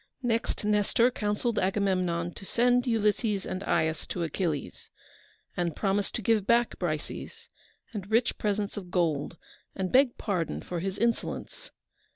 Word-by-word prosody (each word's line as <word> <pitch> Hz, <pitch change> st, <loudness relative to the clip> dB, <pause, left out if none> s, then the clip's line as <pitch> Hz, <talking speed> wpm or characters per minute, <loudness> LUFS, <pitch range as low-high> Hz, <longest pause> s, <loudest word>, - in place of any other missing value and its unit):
Next 230 Hz, -3 st, 0 dB
Nestor 210 Hz, +4 st, +3 dB
counselled 210 Hz, +1 st, 0 dB
Agamemnon 185 Hz, -3 st, 0 dB
to -, -, -10 dB
send 245 Hz, +4 st, +2 dB
Ulysses 210 Hz, -3 st, +1 dB
and 185 Hz, -, -4 dB
Aias 160 Hz, -1 st, 0 dB
to 175 Hz, -, -2 dB
Achilles, 160 Hz, -1 st, -3 dB, 0.7 s
and 170 Hz, -3 st, -1 dB
promise 200 Hz, 0 st, +1 dB
to 235 Hz, -, -4 dB
give 215 Hz, -2 st, +2 dB
back 235 Hz, 0 st, +3 dB
Briseis, 155 Hz, -4 st, -4 dB, 0.4 s
and 200 Hz, -3 st, -5 dB
rich 230 Hz, +2 st, +2 dB
presents 205 Hz, -1 st, -1 dB
of 185 Hz, -3 st, -6 dB
gold, 170 Hz, -3 st, 0 dB, 0.4 s
and 185 Hz, -1 st, -2 dB
beg 260 Hz, -1 st, +4 dB
pardon 180 Hz, -6 st, -2 dB
for 175 Hz, -, -4 dB
his 190 Hz, +2 st, -3 dB
insolence. 235 Hz, -, -2 dB
200 Hz, 140 wpm, -28 LUFS, 180-230 Hz, 0.7 s, beg